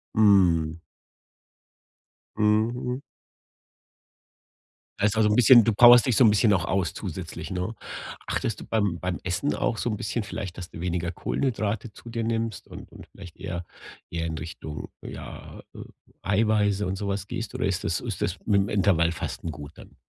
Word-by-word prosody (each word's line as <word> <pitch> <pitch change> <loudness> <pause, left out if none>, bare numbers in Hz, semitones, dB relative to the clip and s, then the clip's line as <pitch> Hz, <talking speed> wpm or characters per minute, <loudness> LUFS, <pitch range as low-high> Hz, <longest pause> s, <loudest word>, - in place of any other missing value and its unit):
Mhm. 90 -7 +4 1.6
Mhm. 115 +5 +1 2.0
Heißt, 105 +1 +2
also 110 -1 +4
'n 105 - +2
bisschen 120 -1 +8
du 115 - +2
powerst 120 +3 +8
dich 125 -4 +2
so 130 - +6
'n 110 - +7
bisschen 105 0 +4
auch 90 -2 +1
aus 95 -3 0
zusätzlich, - - -6
ne? 90 +5 -3 0.5
Achtest - - -2
du - - -8
beim 100 -6 0
beim 90 -1 -3
Essen 90 +10 -1
auch 115 - -1
so - - -1
'n 105 - -2
bisschen 110 +2 -2
vielleicht, 95 -3 -6
dass 90 -2 -7
du 85 - -9
weniger 90 -1 -2
Kohlenhydrate 110 0 -2
zu 120 - -12
dir 115 -1 -3
nimmst 115 0 -2
und - - -11
und - - -13
vielleicht 90 -4 -13
eher 85 0 -5 0.5
eher 85 -1 -2
in 80 -1 -4
Richtung, 80 -1 -7
ja, - - -9
äh, - - -11 0.4
Eiweiße 105 0 +2
und 95 +1 -2
so 100 +1 -4
was 100 -1 -2
gehst 115 -2 -5
oder - - -1
ist 95 0 -1
das 85 - -1
ist - - -5
das 90 +2 -1
mit’m 100 -2 +2
Intervallfasten 85 -4 0
gut 75 -1 -9
dann? - - -15
100 Hz, 165 wpm, -26 LUFS, 90-110 Hz, 2.0 s, bisschen